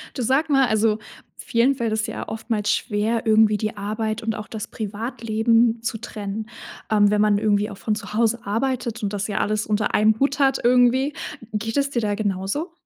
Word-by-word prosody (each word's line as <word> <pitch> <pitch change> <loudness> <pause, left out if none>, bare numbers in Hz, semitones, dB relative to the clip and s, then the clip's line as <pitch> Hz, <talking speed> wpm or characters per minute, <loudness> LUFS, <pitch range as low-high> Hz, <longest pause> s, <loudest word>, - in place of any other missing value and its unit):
Du 255 - -3
sag 270 +6 +1
mal, 270 -2 +4
also, 220 -1 +2 0.4
vielen 240 +4 +1
fällt 230 -4 -1
es 220 0 -1
ja - - -6
oftmals 220 -1 -2
schwer 220 +1 -1
irgendwie 220 -1 +5
die 215 +1 -3
Arbeit 215 +2 -3
und 225 -1 -2
auch 210 - -7
das 220 0 -6
Privatleben 225 +1 0
zu 230 0 -3
trennen. 215 -1 -6 0.4
Ähm, 205 -1 +5
wenn 210 0 +2
man 210 -1 +4
irgendwie 210 -1 +1
auch 200 - -9
von 210 +2 -1
zu 210 - -8
Hause 230 +1 +1
arbeitet 235 +2 -2
und 205 0 -2
das 205 0 -2
ja 210 -1 -2
alles 215 +1 0
unter 210 0 0
einem 215 +1 +3
Hut 280 +1 +1
hat 270 -1 +3
irgendwie. 250 +3 +4 0.4
Geht 220 +3 -2
es 280 0 +2
dir 245 -4 -1
da 205 -2 0
genauso? 205 - -2
220 Hz, 195 wpm, -23 LUFS, 210-235 Hz, 0.4 s, irgendwie